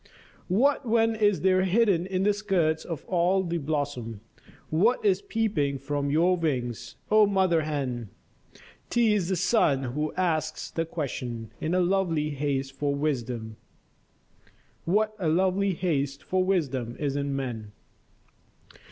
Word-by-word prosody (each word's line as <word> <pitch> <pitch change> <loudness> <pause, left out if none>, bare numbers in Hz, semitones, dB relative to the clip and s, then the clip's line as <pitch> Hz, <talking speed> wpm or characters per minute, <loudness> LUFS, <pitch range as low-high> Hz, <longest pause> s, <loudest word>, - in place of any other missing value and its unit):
What 255 +10 +3
then 225 -1 +3
is 205 -3 +2
there 185 0 +3
hidden 190 -2 +2
in 190 0 -1
the 205 +1 +3
skirts 185 -7 0
of 165 -4 -6
all 185 +1 +2
the 170 -1 -2
blossom, 140 -7 -3 0.5
What 215 +9 +2
is 195 -1 +3
peeping 200 -12 -1
from 140 +1 -2
your 170 +5 +3
wings, 125 -8 -3 0.2
oh 215 -1 +6
mother 190 -4 +2
hen? 135 -7 -3 0.8
'T 235 -3 +3
is 190 -4 0
the 190 - +1
sun 170 - +2
who 150 +2 -1
asks 160 -4 -1
the 165 - -1
question, 125 -8 -5
in 165 +3 0
a - - +3
lovely 175 -5 +1
haste 135 -2 -2
for 140 +1 -1
wisdom 120 -6 -3 1.3
What 215 +5 +1
a 170 -4 0
lovely 190 +3 +2
haste 140 -6 -1
for 185 0 +1
wisdom 135 -11 -1
is 140 -2 -2
in 140 -1 -1
men? 115 -6 -4
165 Hz, 140 wpm, -27 LUFS, 140-190 Hz, 1.3 s, oh